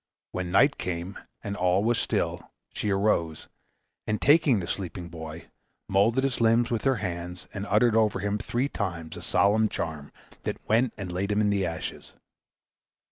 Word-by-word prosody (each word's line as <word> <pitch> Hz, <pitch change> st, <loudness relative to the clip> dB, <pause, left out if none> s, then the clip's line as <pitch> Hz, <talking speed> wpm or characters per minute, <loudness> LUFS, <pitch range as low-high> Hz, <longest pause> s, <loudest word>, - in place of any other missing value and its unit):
When 90 Hz, -1 st, -3 dB
night 140 Hz, +10 st, +4 dB
came 90 Hz, +2 st, -4 dB, 0.2 s
and 100 Hz, 0 st, -3 dB
all 90 Hz, 0 st, +2 dB
was 115 Hz, +1 st, +2 dB
still, -, -, -1 dB, 0.2 s
she 105 Hz, -, -2 dB
arose, 95 Hz, -5 st, +1 dB, 0.6 s
and 110 Hz, 0 st, 0 dB
taking 145 Hz, -6 st, +5 dB
the 90 Hz, -, -4 dB
sleeping 90 Hz, -1 st, -5 dB
boy, 80 Hz, 0 st, -9 dB, 0.4 s
moulded 115 Hz, +7 st, +3 dB
his 135 Hz, -3 st, -1 dB
limbs 115 Hz, +1 st, +3 dB
with 115 Hz, +1 st, -1 dB
her 135 Hz, -1 st, +4 dB
hands, 90 Hz, -3 st, -5 dB
and 100 Hz, 0 st, -4 dB
uttered 110 Hz, +1 st, +4 dB
over 110 Hz, -3 st, +3 dB
him 100 Hz, +2 st, -1 dB
three 120 Hz, +4 st, -1 dB
times 85 Hz, -, -4 dB
a -, -, -8 dB
solemn 105 Hz, +4 st, +3 dB
charm, 75 Hz, -3 st, -4 dB, 0.3 s
then -, -, -3 dB
went 115 Hz, +3 st, +2 dB
and 95 Hz, -3 st, -5 dB
laid 95 Hz, +3 st, -2 dB
him 105 Hz, -, +2 dB
in 105 Hz, -1 st, +3 dB
the 100 Hz, -2 st, +1 dB
ashes. 80 Hz, -1 st, -6 dB
100 Hz, 170 wpm, -27 LUFS, 90-115 Hz, 0.6 s, taking